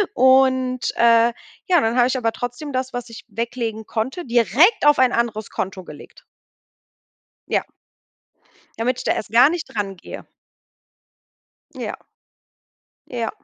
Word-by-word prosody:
Und, 260 0 +3
äh, 235 0 +4 0.3
ja, 350 -4 +4
dann 225 +2 0
habe 245 0 +5
ich 260 - -1
aber 230 -2 0
trotzdem 245 +6 -6
das, 260 0 -3
was 245 0 -5
ich 230 - -11
weglegen 225 0 -4
konnte, 260 +10 -3
direkt 260 - +3
auf 295 -2 +5
ein 255 -1 +4
anderes 220 -3 -1
Konto 190 0 -4
gelegt. 150 -4 -14 1.2
Ja. - - 0 1.1
Damit 250 +2 -1
ich - - -6
da - - +2
erst 205 - -5
gar 240 +4 +7
nicht 340 +1 -3
dran 195 -2 -3
gehe. - - -10 1.5
Ja. - - -5 1.1
Ja. 235 -2 -3
245 Hz, 135 wpm, -21 LUFS, 225-260 Hz, 1.5 s, gar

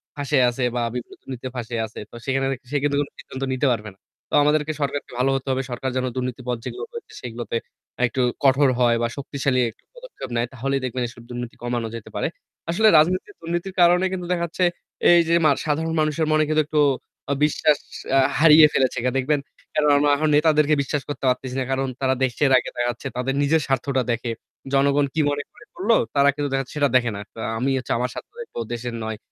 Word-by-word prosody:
ফাঁইসে 145 0 0
আছে 120 +1 -3
বা 120 - 0
বিভিন্ন 125 - -6
দুর্নীতিতে 130 -1 -6
ফাঁইসে 120 -1 -4
আছে। 110 - -10
তো - - -12
সেখানে 135 0 0 0.3
সেখানে 145 0 +1
কোন 145 - -4
সিদ্ধান্ত 130 +1 -7
নিতে 130 +2 +1
পারবে 110 -3 -2
না। - - -31 0.3
তো - - -15
আমাদেরকে 150 +1 +2
সরকারকে 140 0 -2
ভালো 130 - +3
হতে 135 0 -4
হবে। 130 - 0
সরকার 125 +2 -2
যেন 130 0 0
দুর্নীতির 125 -1 -4
পথ 125 -1 0
যেগুলো 405 - -5
রয়েছে 470 -1 -9
সেগুলোতে 120 -1 -4 0.5
একটু 125 +2 -1 0.2
কঠোর 135 0 +5
হয় 120 -1 +4
বা 120 - +2
শক্তিশালী 140 -2 0 0.3
পদক্ষেপ - - -9
নেয় 120 +1 +1
তাহলেই 135 +2 -1
দেখবেন 130 0 -3
এ - - -9 0.2
দুর্নীতি 120 -1 -6
কমানো 120 -1 -2
যেতে 115 - -8
পারে। - - 0 0.4
আসলে 220 +6 +3
রাজনীতির 185 - +2
দুর্নীতির 175 +3 -3
কারণে 175 +2 +5
কিন্তু 180 -2 -4
দেখাচ্ছে 170 +1 -1 0.5
এই 175 0 +8
যে 170 - +2 0.3
সাধারণ 160 +2 0
মানুষের 155 +1 +1
মনে 155 0 +4
কিন্তু 155 0 +3
একটু 155 -1 +2 0.6
বিশ্বাস 150 0 +2 0.6
হারিয়ে 155 0 +8
ফেলেছে 130 -2 +1 0.2
দেখবেন। 145 +3 +1 0.3
কারণ 150 -1 +2
আমরা 145 +1 +3
এখন 155 +2 +1
নেতাদেরকে 150 0 +4
বিশ্বাস 140 +1 -2
করতে 145 - -5
পারতেছি 125 0 -2
না। - - 0
কারণ 135 0 0
তারা 130 -1 +2
দেশের 130 +2 +1
আগে - - -1
দেখাচ্ছে, 120 0 -2
তাদের 130 +2 -1
নিজের 155 +3 +3
স্বার্থটা 135 0 0
দেখে। 120 0 -2 0.4
জনগণ 140 +1 +3
কি 160 - +1
মনে 145 0 -2 0.3
করলো, 220 +5 +2 0.2
তারা 140 0 +5
কিন্তু 145 -1 -2
দেখাচ্ছে 135 -1 -2
সেটা 145 -1 +3
দেখে 120 -2 +3
না। 100 - -5 0.4
আমি 135 +3 +1 0.3
আমার 125 +1 -1
স্বার্থ - - -8
দেখবো, 470 - -8
দেশের 120 0 -4
নয়। 110 0 -4
140 Hz, 190 wpm, -23 LUFS, 125-155 Hz, 0.6 s, এই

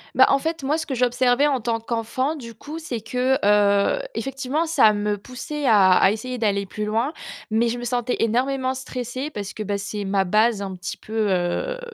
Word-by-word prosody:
Bah, - - +7
en 275 - +4
fait 320 +3 -3
moi, 285 +3 0
ce 315 - -3
que 275 - -4
j'observais 250 +2 +2
en 275 -3 +1
tant 230 0 -1
qu'enfant, 235 +6 -2
du 235 -6 -9
coup, 295 +8 -8
c'est 265 -8 -5
que, 250 +4 0
heu, 205 - +3
effectivement, 270 - -2
ça 220 -10 +5
me 205 0 -1
poussait 270 +6 -6
à 200 -6 +6
à 190 - +5
essayer 250 +4 -4
d'aller 200 -3 0
plus 210 +3 -4
loin, 225 +8 0 0.4
mais 225 +2 +2
je 235 +1 -2
me - - -7
sentais 245 0 -1
énormément 255 +3 +1
stressée 255 +1 -5
parce 200 -5 -6
que, 215 - -5
bah, 205 0 -2
c'est 200 +1 -4
ma 195 0 +1
base 215 +3 +2
un 195 -2 -5
petit 185 +2 -6
peu, 215 -2 -2
heu, 185 - -1
235 Hz, 205 wpm, -23 LUFS, 210-265 Hz, 0.4 s, Bah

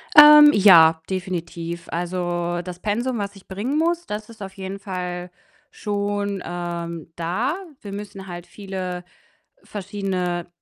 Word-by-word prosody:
Ähm, 295 0 +11
ja, 165 -5 +7
definitiv. 170 -2 -4
Also, 175 0 -2
das 180 0 -8
Pensum, 235 +5 -1
was 200 -1 -4
ich 195 - -16
bringen 225 +10 -2
muss, 340 +1 +1
das 210 +1 -5
ist 220 -2 -14
auf 195 -1 -7
jeden 195 +1 -6
Fall 180 -2 -5 0.4
schon, 205 -1 -2
ähm, 170 -2 -5
da. 185 - -1 0.3
Wir 200 - -8
müssen 200 -1 -7
halt 175 0 -8
viele 185 -3 -5 0.6
verschiedene 190 -4 -3
190 Hz, 130 wpm, -23 LUFS, 175-205 Hz, 0.6 s, Ähm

